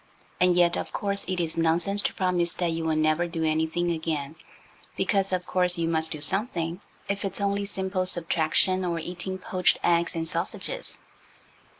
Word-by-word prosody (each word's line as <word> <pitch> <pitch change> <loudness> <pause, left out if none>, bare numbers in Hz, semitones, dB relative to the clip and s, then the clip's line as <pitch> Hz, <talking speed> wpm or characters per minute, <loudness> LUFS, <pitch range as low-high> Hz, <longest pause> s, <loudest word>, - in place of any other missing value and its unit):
And 180 -1 +4
yet, 175 -1 +4
of - - -4
course, 200 -1 -1
it 185 -1 -1
is 165 -1 -1
nonsense 170 +5 +2
to - - -1
promise 180 -2 0
that 175 -2 0
you 165 0 -3
will 160 -1 +1
never 155 +2 +2
do 165 -1 -3
anything 160 +2 0
again, 160 -3 -3 0.6
because, 195 -2 +1
of 180 -1 -1
course, 180 -1 +1
you 165 -1 0
must 160 -1 +2
do 155 - -5
something, 175 0 +2 0.3
if 200 +1 -2
it's 195 0 -3
only 200 0 0
simple 190 -2 -2
subtraction 175 +2 +1
or 170 -2 -1
eating 180 +3 -4
poached 180 -3 +1
eggs 170 0 +2
and 165 0 +2
sausages. 185 - -2
175 Hz, 175 wpm, -26 LUFS, 165-185 Hz, 0.6 s, And